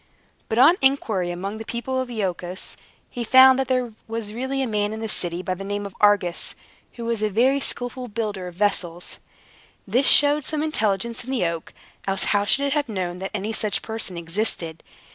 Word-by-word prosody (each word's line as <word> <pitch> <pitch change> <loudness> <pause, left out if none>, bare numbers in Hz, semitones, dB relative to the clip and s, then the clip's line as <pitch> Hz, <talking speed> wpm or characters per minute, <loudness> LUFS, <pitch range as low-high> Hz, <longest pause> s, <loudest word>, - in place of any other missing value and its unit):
But 220 - -1
on 310 +9 +7
inquiry 225 -9 +2
among 195 +5 -4
the - - -5
people 250 +3 -2
of 255 - -5
Iolchos, 185 -5 -4 0.4
he 240 - -3
found 260 +2 +7
that 265 - 0
there 250 -3 0
was 225 -2 -4
really 265 +3 -2
a - - -1
man 210 -1 0
in 220 - -5
the 225 - -3
city, 175 -3 -2
by 185 - -1
the 190 +2 -7
name 205 +1 -3
of 200 - -7
Argus, 205 -4 +2 0.4
who 235 - -7
was 230 -2 -1
a 215 - +1
very 255 +7 +3
skilful 250 -1 -3
builder 205 -4 -3
of 175 - -9
vessels. 180 -3 -1 0.7
This 245 +7 +2
showed 290 +1 +5
some 305 +2 -2
intelligence 230 -6 0
in 250 - -10
the 260 -8 +1
oak; 165 -1 -3 0.4
else 195 0 +1
how 205 -1 +2
should 275 +6 +2
it 280 - 0
have 290 -4 0
known 180 -4 -3
that 190 - -4
any 210 +2 -2
such 215 -2 0
person 220 -5 -3
existed? 165 -2 -3
215 Hz, 200 wpm, -23 LUFS, 190-255 Hz, 0.7 s, on